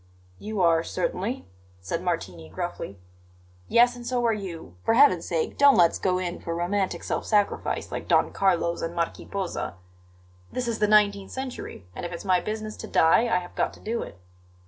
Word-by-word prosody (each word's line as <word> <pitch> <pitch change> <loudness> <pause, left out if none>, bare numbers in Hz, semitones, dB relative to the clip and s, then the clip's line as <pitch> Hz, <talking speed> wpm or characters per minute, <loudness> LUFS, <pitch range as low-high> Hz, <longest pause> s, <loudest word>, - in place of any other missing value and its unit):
"You 215 -2 -3
are, 165 -2 +4
certainly," 190 +9 -2 0.3
said 165 - -3
Martini 95 - -3
gruffly. 100 +4 -5 0.7
"Yes, 240 +1 +5
and 245 - -9
so 245 0 0
are 230 - +3
you. 175 - -7
For 225 - +3
Heaven's 235 -11 +5
sake, 165 -2 -2
don't 280 -1 +7
let's 170 -2 +4
go 185 -1 +1
in 180 -1 -3
for 165 - -4
romantic 185 +3 -1
self - - -2
sacrifice, 205 -2 0
like - - -5
Don - - +3
Carlos 175 -3 +1
and 165 +1 -3
Marquis 170 -1 -2
Posa. 190 - -3 0.8
This 250 -1 -2
is 230 -1 -2
the 210 - +3
nineteenth 205 -2 +3
century; 260 - -6
and - - -6
if 175 - -4
it's 170 +3 -7
my 185 -2 +4
business 215 +2 -4
to - - -7
die, 165 +8 +4
I 205 - +2
have 175 - -11
got - - 0
to - - -17
do 230 +2 -2
it." - - -8
190 Hz, 190 wpm, -26 LUFS, 170-220 Hz, 0.8 s, don't